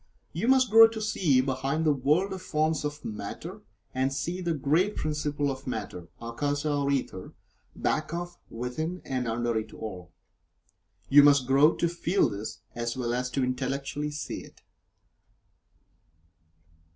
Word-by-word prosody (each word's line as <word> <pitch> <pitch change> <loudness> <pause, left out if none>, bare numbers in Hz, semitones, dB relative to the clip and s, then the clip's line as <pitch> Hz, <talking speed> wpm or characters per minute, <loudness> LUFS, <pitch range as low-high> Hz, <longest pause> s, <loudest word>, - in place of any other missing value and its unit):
You 230 - -2
must 255 -3 +4
grow 225 +1 +10
to 225 0 -6
see 180 -11 +2
behind 135 +4 -1
the 150 - +4
world 155 +9 +1
of 190 - -6
forms 155 -1 0
of 150 0 -5
Matter, 105 - -6 0.3
and 130 +1 0
see 170 +6 -3
the 170 -2 0
great 160 +9 +1
principle 150 -2 -1
of 135 0 -8
Matter 100 -7 -5
(Akasa 145 +5 -2
or 140 -1 0
Ether) 130 -9 -2 0.4
back 155 0 -1
of, 175 +1 -5
within, 155 +10 -4
and 130 -2 -2
under 120 +1 -1
it 110 - -7
all. 90 -5 -7 1.0
You 145 +1 +9
must 140 -2 +5
grow 140 +5 +5
to 170 - +1
feel 170 +3 +1
this, 110 +2 -6
as 120 +1 -3
well 120 -2 -1
as 125 +1 -1
to 135 +1 -1
intellectually 135 +3 -2
see 150 0 -5
it. - - -17
145 Hz, 150 wpm, -28 LUFS, 125-160 Hz, 1.0 s, grow